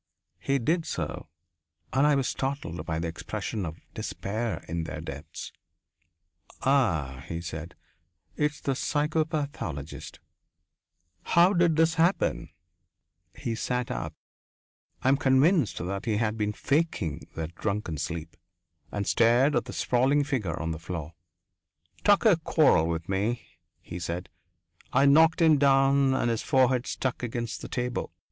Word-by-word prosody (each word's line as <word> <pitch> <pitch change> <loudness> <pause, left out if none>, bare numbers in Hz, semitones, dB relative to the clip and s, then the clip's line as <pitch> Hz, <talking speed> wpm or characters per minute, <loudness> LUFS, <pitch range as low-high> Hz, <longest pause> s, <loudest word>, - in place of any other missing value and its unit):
He 135 +9 +1
did 160 +7 0
so, - - -4 0.7
and 135 +3 +4
I 150 - +4
was 135 -2 +1
startled 135 - -3
by 80 -2 -1
the 85 +1 -2
expression 90 +3 -4
of 80 +1 -7 0.2
despair 110 +3 -3
in 85 0 -3
their 75 -1 -6
depths. 70 -3 -8 1.1
"Ah," 85 - +1
he 85 - -4
said, 85 0 -7 0.6
"it's 150 0 0
the 140 - 0
psychopathologist." 145 - -2 1.0
"How 175 +3 +4
did 175 -3 +3
this 165 +1 +3
happen?" 175 +4 +1 0.9
He 115 - -3
sat 125 +2 -2
up - - -4 0.9
I 130 - +4
am 135 - +4
convinced 135 - +3
that 95 +2 -4
he 110 -3 +1
had 110 -1 0
been 105 -1 -1
faking 120 - -1
that 80 +1 -4
drunken 100 -6 -3
sleep 80 +1 -4 0.6
and 100 -1 -2
stared 120 +8 +4
at - - +1
the - - -7
sprawling 135 +4 +2
figure 120 - -2
on 80 0 -2
the 80 - -4
floor. 80 -2 -6 0.9
"Tucker 205 -2 +5
quarrelled 145 - +3
with 85 0 -3
me," 105 +5 -1 0.4
he 85 - -7
said. 85 +1 -4 0.6
"I 135 +2 +4
knocked 160 +4 +5
him 155 -3 +5
down 135 -1 +4
and 120 - +1
his 115 - -1
forehead 130 -1 +2
struck 130 -2 -2
against 120 -1 -4
the - - -6
table. 125 0 -2
120 Hz, 140 wpm, -27 LUFS, 85-140 Hz, 1.1 s, Tucker